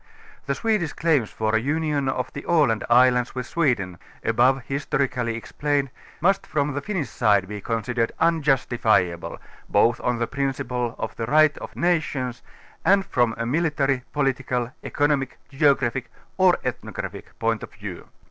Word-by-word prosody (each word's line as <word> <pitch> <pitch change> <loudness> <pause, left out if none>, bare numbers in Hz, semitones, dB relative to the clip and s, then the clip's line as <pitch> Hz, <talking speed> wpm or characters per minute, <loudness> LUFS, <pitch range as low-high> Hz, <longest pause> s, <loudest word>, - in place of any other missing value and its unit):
The 140 - 0
Swedish 210 -6 0
claims 150 -9 +1
for 110 0 -1
a - - +4
union 145 +1 0
of 125 -1 -3
the 140 - -6
Aland 145 -10 +3
islands 125 +1 +4
with 125 -1 -3
Sweden, 115 - 0 0.2
above 125 +3 +3
historically 135 -4 -1
explained, 140 +3 -1 0.3
must 195 +3 +2
from 145 -1 0
the 145 - -2
Pinnish 190 -7 -2
side 105 -5 +2
be 105 0 -6
considered 115 +2 -1
'^unjustifiable 125 - +1 0.3
both 120 +1 +3
on 125 -1 0
the 120 - 0
prin 135 +2 -1
ciple 125 -1 -3
of - - -4
the 115 - -3
Right 155 +2 +5
of - - -9
Nations 150 -8 0 0.4
and 195 0 +4
from 120 -10 +1
a 115 - -2
military, 140 -1 +1
political 130 -4 -1
economic, 145 -2 0
geographic 135 -4 +1 0.3
or - - +4
ethnographic - - -6
point - - 0
of - - -8
view. - - -8
135 Hz, 145 wpm, -24 LUFS, 120-150 Hz, 0.4 s, Right